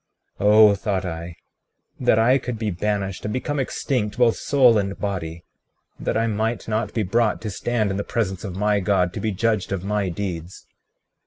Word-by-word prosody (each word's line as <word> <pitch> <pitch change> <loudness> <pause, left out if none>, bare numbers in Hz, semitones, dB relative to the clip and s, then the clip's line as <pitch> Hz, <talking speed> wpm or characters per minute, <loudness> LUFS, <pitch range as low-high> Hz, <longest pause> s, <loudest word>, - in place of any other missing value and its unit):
36:15 105 - +1
Oh, 105 0 +7
thought 100 -1 -2
I, 85 -1 -6 0.6
that - - +3
I 125 +4 +4
could 120 -2 -5
be 110 -1 -2
banished 95 +1 -2
and 105 - -3
become 140 +5 -2
extinct 125 -4 -2
both 120 -2 +4
soul 125 -6 +4
and 100 -1 -3
body, 85 -5 -4 0.6
that - - -1
I 115 - +1
might 110 +1 -1
not 110 +1 -2
be 110 - +1
brought 110 +3 +1
to 110 - -4
stand 110 +2 -1
in 95 - -2
the 100 - -2
presence 95 -5 -2
of 95 -4 -5
my 105 +1 +1
God, 90 -2 +1
to - - -4
be 110 - -1
judged 105 0 0
of 95 -2 -2
my 100 -1 -1
deeds. 90 -1 -5
105 Hz, 190 wpm, -23 LUFS, 95-115 Hz, 0.6 s, Oh